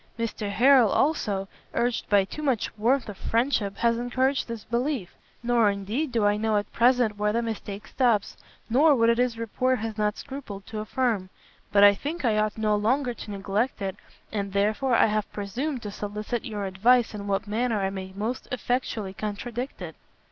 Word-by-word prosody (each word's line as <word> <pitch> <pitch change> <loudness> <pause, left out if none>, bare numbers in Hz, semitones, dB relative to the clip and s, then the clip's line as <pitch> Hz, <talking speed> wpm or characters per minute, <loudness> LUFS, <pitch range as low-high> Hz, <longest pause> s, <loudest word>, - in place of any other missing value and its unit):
Mr 225 -2 -3
Harrel, 250 +2 +5
also, 210 -10 +1 0.3
urged 240 0 0
by 200 -2 +4
too 305 - -7
much 265 -7 -1
warmth 240 +5 +1
of 205 - -6
friendship, 225 -3 0
has 235 +1 +2
encouraged 260 +3 0
this 230 -2 -6
belief; 240 - -2 0.3
nor, 235 -3 +3
indeed, 210 +9 -2
do 225 -3 +1
I 205 0 +3
know 215 0 +1
at 205 - -3
present 235 -3 +3
where 210 0 +2
the 235 +2 0
mistake 210 -2 -5
stops, 235 -6 +1 0.3
nor 285 +6 +5
what 230 -1 +4
it 235 - 0
is 245 -2 +1
report 255 +3 0
has 220 -1 -5
not 210 0 +1
scrupled 255 -8 -8
to 220 -1 -6
affirm. 215 -3 -1 0.4
But 200 0 +5
I 205 0 +9
think 295 - -4
I 215 -3 +3
ought 215 0 0
no 215 -1 +2
longer 245 +5 +1
to 225 - -9
neglect 205 +5 -1
it, 195 -2 -3 0.4
and 200 -2 -3
therefore 215 +6 +2
I - - +6
have 215 -1 -1
presumed 245 +7 -3
to 205 - -5
solicit 210 +4 -4
your 210 -4 -4
advice 225 +6 +3
in 205 -1 -6
what 200 +2 0
manner 220 +1 0
I 195 0 0
may 190 -1 -6
most 220 +5 -3
effectually 245 -5 -2
contradict 220 +3 -5
it." 160 -2 -7
220 Hz, 185 wpm, -26 LUFS, 205-245 Hz, 0.4 s, I